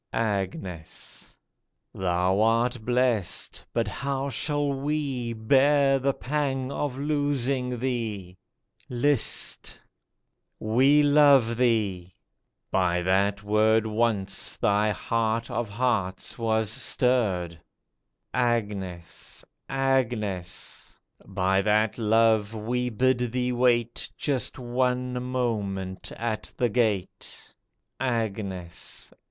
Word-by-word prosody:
54 115 Hz, -, +1 dB, 0.2 s
AGNES 90 Hz, -3 st, -9 dB, 0.6 s
Thou 95 Hz, +1 st, +1 dB
art 115 Hz, +1 st, +2 dB
blest, 120 Hz, -6 st, 0 dB
but 115 Hz, -2 st, 0 dB
how 140 Hz, +5 st, -3 dB
shall 145 Hz, +1 st, -1 dB
we 135 Hz, -4 st, -2 dB
Bear 135 Hz, +4 st, +3 dB
the 135 Hz, +1 st, 0 dB
pang 135 Hz, -2 st, -2 dB
of 140 Hz, -2 st, -3 dB
losing 140 Hz, -3 st, -1 dB
thee? 110 Hz, -7 st, -3 dB, 0.5 s
List! 130 Hz, 0 st, +1 dB, 0.8 s
we 135 Hz, +7 st, +4 dB
love 145 Hz, -5 st, +5 dB
thee 105 Hz, -7 st, 0 dB
I -, -, -42 dB, 0.5 s
By 90 Hz, -2 st, +1 dB
that 100 Hz, +2 st, +1 dB
word 110 Hz, +1 st, +3 dB
Once 110 Hz, -3 st, 0 dB
thy 105 Hz, +1 st, +2 dB
heart 115 Hz, +2 st, -1 dB
of 120 Hz, -3 st, -2 dB
hearts 100 Hz, -4 st, -1 dB
was 110 Hz, -1 st, +1 dB
stirred. 100 Hz, -10 st, 0 dB, 0.7 s
Agnes! 105 Hz, -8 st, -3 dB, 0.2 s
Agnes! 120 Hz, -9 st, -2 dB, 0.4 s
By 95 Hz, 0 st, +1 dB
that 105 Hz, +2 st, +1 dB
love 110 Hz, -1 st, +3 dB
we 125 Hz, +3 st, -1 dB
bid 130 Hz, +2 st, +2 dB
thee 125 Hz, 0 st, 0 dB
wait 120 Hz, -1 st, +1 dB
Just 140 Hz, -4 st, -1 dB
one 125 Hz, 0 st, -1 dB
moment 105 Hz, -7 st, -3 dB
at 110 Hz, -2 st, -3 dB
the 120 Hz, -, +2 dB
gate! 105 Hz, -5 st, -2 dB, 0.5 s
Agnes 100 Hz, -8 st, -4 dB
115 Hz, 95 wpm, -26 LUFS, 100-130 Hz, 0.8 s, love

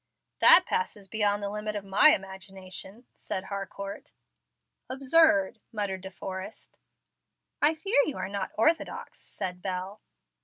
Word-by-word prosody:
"That -, -, +9 dB
passes 455 Hz, -, -3 dB
beyond 205 Hz, -1 st, 0 dB
the 200 Hz, -, -2 dB
limit 210 Hz, 0 st, -5 dB
of 205 Hz, -1 st, -5 dB
my 195 Hz, +10 st, +7 dB
imagination," 190 Hz, 0 st, -3 dB
said 185 Hz, -, -5 dB
Harcourt. 200 Hz, 0 st, -7 dB, 0.8 s
"Absurd!" 260 Hz, -6 st, +3 dB
muttered 200 Hz, -4 st, -3 dB
De 190 Hz, -, -8 dB
Forrest. 190 Hz, +2 st, -9 dB, 0.8 s
"I 305 Hz, +2 st, +3 dB
fear 320 Hz, 0 st, +1 dB
you 295 Hz, -, -4 dB
are -, -, -4 dB
not 200 Hz, -1 st, -4 dB
orthodox," 320 Hz, +10 st, -1 dB
said 180 Hz, -1 st, -6 dB
Bel. 190 Hz, +2 st, -5 dB
200 Hz, 125 wpm, -27 LUFS, 190-225 Hz, 0.8 s, That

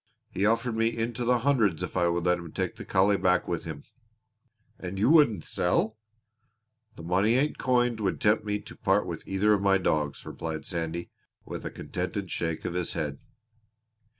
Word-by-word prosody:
He 100 Hz, +2 st, +1 dB
offered 115 Hz, +1 st, +1 dB
me 115 Hz, 0 st, +2 dB
into 115 Hz, +2 st, -2 dB
the 120 Hz, 0 st, +2 dB
hundreds 115 Hz, -10 st, +2 dB
if -, -, -5 dB
I 90 Hz, -2 st, +3 dB
would 85 Hz, 0 st, 0 dB
let 90 Hz, 0 st, +3 dB
him 85 Hz, -2 st, -9 dB
take -, -, -2 dB
the -, -, -9 dB
collie 100 Hz, +2 st, +3 dB
back 90 Hz, 0 st, +2 dB
with 85 Hz, -2 st, -3 dB
him." 75 Hz, -3 st, -6 dB, 1.0 s
"And 90 Hz, +1 st, -5 dB
you 110 Hz, +8 st, +3 dB
wouldn't 140 Hz, -, +5 dB
sell?" 110 Hz, +5 st, 0 dB, 1.0 s
"The 80 Hz, -, -10 dB
money 95 Hz, +7 st, +2 dB
ain't 145 Hz, +4 st, +1 dB
coined 120 Hz, -2 st, +2 dB
would 100 Hz, -3 st, -1 dB
tempt 105 Hz, +1 st, +3 dB
me 105 Hz, -1 st, -2 dB
to -, -, -12 dB
part -, -, +2 dB
with -, -, -5 dB
either 100 Hz, +2 st, +3 dB
of 100 Hz, -, +1 dB
my 100 Hz, -1 st, +4 dB
dogs!" 75 Hz, -6 st, 0 dB
Sandy -, -, -14 dB
replied, 80 Hz, +1 st, -4 dB, 0.4 s
with -, -, -7 dB
a -, -, -3 dB
contented -, -, -4 dB
shake 80 Hz, -2 st, -2 dB
of -, -, -2 dB
his 90 Hz, -1 st, -2 dB
head. 75 Hz, -4 st, -3 dB
95 Hz, 185 wpm, -28 LUFS, 85-115 Hz, 1.0 s, wouldn't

